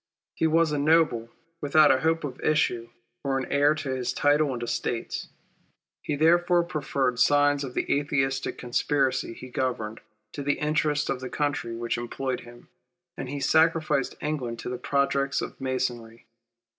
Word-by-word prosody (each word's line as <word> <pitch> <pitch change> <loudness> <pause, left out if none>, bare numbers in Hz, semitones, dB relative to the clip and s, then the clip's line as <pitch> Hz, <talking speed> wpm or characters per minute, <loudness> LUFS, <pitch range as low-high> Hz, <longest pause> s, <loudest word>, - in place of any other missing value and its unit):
He 160 - +1
was 160 0 +3
a 150 - 0
noble, 145 -7 +3 0.3
without 150 +1 +5
a 130 - +3
hope 165 0 +1
of 135 -4 -6
issue, 120 -6 +1 0.3
or 135 -1 0
of 135 - -2
a - - -13
near - - -2
heir 145 +2 +4
to 140 -3 -4
his 125 -1 -2
title 145 +1 +2
and 120 -2 -4
estates. 120 0 -3 0.7
He 150 - -2
therefore 175 +3 +4
preferred 140 -6 -1
the - - -13
designs 145 +2 +3
of 125 -2 -7
the - - 0
Atheistic 135 -2 -1
conspiracy 130 +1 0
he 130 - -10
governed, 120 -4 -3 0.3
to 145 - -5
the 145 +1 +1
interests 150 -1 0
of 135 - -1
the 130 0 -6
country 145 -6 -2
which 115 0 -2
employed 130 +2 -3
him, 120 0 -14 0.5
and 135 - -6
he 140 +1 -4
sacrificed 160 -2 +2
England 135 -6 -3
to - - -6
the 125 -1 -4
projects 140 0 +1
of - - -6
Masonry. 120 -3 -3
140 Hz, 170 wpm, -26 LUFS, 125-150 Hz, 0.7 s, without